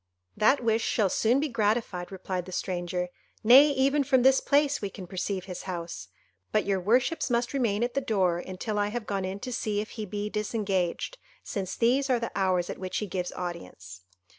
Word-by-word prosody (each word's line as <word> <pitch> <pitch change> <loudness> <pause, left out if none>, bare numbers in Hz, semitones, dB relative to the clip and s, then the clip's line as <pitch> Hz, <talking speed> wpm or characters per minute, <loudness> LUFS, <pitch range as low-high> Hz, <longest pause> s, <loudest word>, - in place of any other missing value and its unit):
"That 250 +5 +3
wish 225 0 +2
shall 200 -5 +1
soon 240 +4 +3
be 305 - 0
gratified," 215 -6 -1
replied 185 -1 -4
the - - -8
stranger, 180 -1 -2 0.3
"nay 265 +7 +8
even 275 +1 +2
from 260 -2 +3
this 265 0 +5
place 285 0 +2
we 200 - -2
can 190 -1 -9
perceive 185 +1 -3
his 180 -2 -6
house: 170 - -5 0.4
but 215 - +2
your 195 -1 +1
worships 250 - +1
must 240 +1 0
remain 235 -5 +1
at 240 - -1
the 275 - 0
door 185 -8 +1
until 190 +4 -4
I 205 - +2
have 225 +1 -4
gone 195 -2 -2
in 190 +2 -4
to 250 -1 -4
see 215 -3 -1
if 215 - -4
he 215 -2 -6
be 205 +2 -3
disengaged, 210 - -2 0.2
since 190 -2 -4
these 260 +4 +2
are 250 -2 +3
the 230 - -3
hours 185 -3 +1
at - - -6
which 185 -1 -3
he 210 - -1
gives 180 -2 -3
audience." 130 - -7
210 Hz, 200 wpm, -28 LUFS, 185-240 Hz, 0.4 s, nay